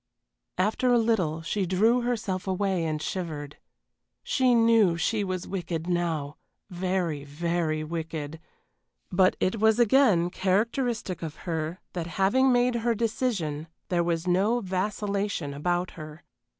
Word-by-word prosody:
After 215 +7 +1
a 240 - +5
little 185 -9 +1
she 190 +2 -1
drew 220 +7 +3
herself 215 -6 -2
away 190 -2 0
and 155 -1 -1
shivered. 155 -4 -5 0.7
She 255 -2 +2
knew 225 -6 +4
she 210 +5 0
was 185 -2 -3
wicked 170 -4 -3
now 165 -5 -1 0.3
very, 180 -5 -1
very 155 +1 -1
wicked 160 -1 -5 0.7
but 185 0 +4
it 195 +4 0
was 220 +1 +4
again 225 -8 +4
characteristic 215 - 0
of 160 -2 -5
her 165 0 -3
that 170 -2 -3
having 255 +8 +4
made 245 0 +3
her 235 0 +1
decision 205 - -1 0.2
there 175 -1 +2
was 170 0 -1
no 195 +7 +2
vacillation 200 -4 -2
about 175 +5 -1
her. 155 0 -10
185 Hz, 130 wpm, -27 LUFS, 165-220 Hz, 0.7 s, a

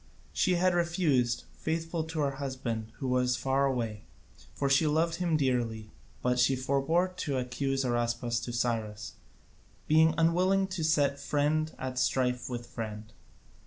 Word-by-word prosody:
She 185 - +2
had 180 +1 +3
refused, 170 -9 +1
faithful 165 +1 -2
to 160 -1 -3
her 140 -1 -1
husband 120 -5 -4
who 135 - -4
was 125 0 +2
far 135 +1 +1
away, 115 -5 -3 0.5
for 140 - 0
she 135 +3 +4
loved 165 +2 +1
him 170 -3 +1
dearly, 120 -6 -1 0.3
but 125 0 +1
she 130 +2 +4
forbore 140 +8 +1
to 140 -6 -2
accuse 135 +2 -1
Araspas 120 0 0
to 120 - -5
Cyrus, 110 -4 -2 0.7
being 160 +1 +5
unwilling 180 +4 +3
to 185 -4 -3
set 145 -3 +2
friend 155 +2 0
at 130 -1 -4
strife 125 -1 0
with 120 -1 -4
friend. 110 -2 -7
135 Hz, 145 wpm, -30 LUFS, 120-160 Hz, 0.7 s, being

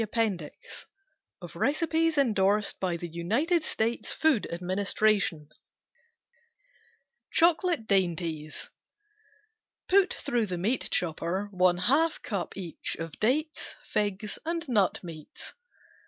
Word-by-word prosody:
APPENDIX 210 -8 -3 0.7
Recipes 320 - +1
endorsed 210 -5 +2
by 180 -3 0
the 175 - -5
UNITED 225 - +1
STATES 230 -5 -1
FOOD 310 -9 +2
ADMINISTRATION 185 -2 +1 1.8
Chocolate 335 -5 +3
Dainties 170 -6 -1 1.2
PUT 390 0 +4
through 240 -6 0
the 180 -2 -3
meat 215 +9 0
chopper 180 +4 -1
one 180 -2 +3
half 285 - +2
cup 200 -4 -3
each 175 -4 -4
of 165 -2 -7
dates, 300 +8 0
figs, 205 0 -2
and 335 0 -2
nut 205 -8 +2
meats. 160 -3 -9
205 Hz, 95 wpm, -28 LUFS, 175-280 Hz, 1.8 s, PUT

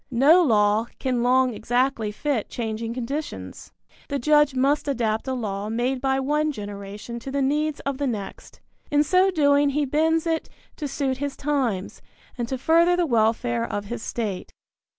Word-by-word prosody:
No 280 +9 +5
law 215 -5 +3
can 255 -3 -1
long 255 +1 +3
exactly 245 0 0
fit 255 0 -2
changing 225 -1 -4
conditions. 275 +5 -5 0.4
The 280 - -1
judge 295 +1 +3
must 280 +3 +1
adapt 230 -4 -1
a 260 - -1
law 205 -3 -3
made 245 +3 -1
by 270 0 +1
one 300 +3 +1
generation 205 0 -7
to 255 - -8
the 280 +1 -1
needs 295 +2 0
of 275 -1 -3
the 285 - 0
next. 210 -5 -6 0.3
In 295 0 +3
so 370 +4 +3
doing 285 -4 +3
he 290 +1 0
bends 320 +4 +1
it 325 -1 -1 0.3
to 300 - -3
suit 270 -1 -2
his 285 0 -4
times, 260 -10 -2 0.3
and 240 -2 -3
to 265 - -3
further 335 +6 +4
the 355 -1 +1
welfare 235 -1 +1
of 205 -3 -3
his 230 +2 -5
state. 215 -6 -4
260 Hz, 170 wpm, -24 LUFS, 230-290 Hz, 0.4 s, No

